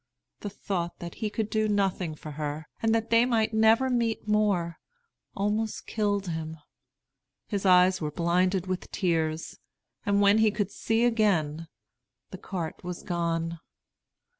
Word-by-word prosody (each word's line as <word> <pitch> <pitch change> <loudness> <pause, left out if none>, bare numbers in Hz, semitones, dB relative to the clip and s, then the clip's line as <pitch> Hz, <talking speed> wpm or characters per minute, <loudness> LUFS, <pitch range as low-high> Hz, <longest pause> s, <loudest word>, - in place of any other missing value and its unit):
The 205 - -5
thought 180 -3 -4
that 170 -1 -7
he 215 - 0
could 215 0 -2
do 215 0 0
nothing 190 -5 0
for 155 0 -9
her, 150 +1 -4 0.2
and 225 0 +2
that 225 0 -2
they 230 0 +6
might 230 -3 +1
never 220 +4 +4
meet 235 -4 -1
more, 200 -6 +1 0.6
almost 210 +2 -1
killed 205 -3 -1
him. 160 -1 -4 0.9
His 200 -2 -2
eyes 180 0 +5
were 150 - -1
blinded 180 +3 +1
with 185 -1 -4
tears; 160 -4 -1 0.4
and 200 -1 +2
when 205 +1 +5
he 220 0 +5
could 205 -1 -2
see 225 +3 +1
again, 170 -9 +1 0.6
the 190 - -8
cart 175 -6 -5
was 180 -1 -6
gone. 170 -1 -2
195 Hz, 145 wpm, -27 LUFS, 170-215 Hz, 0.9 s, they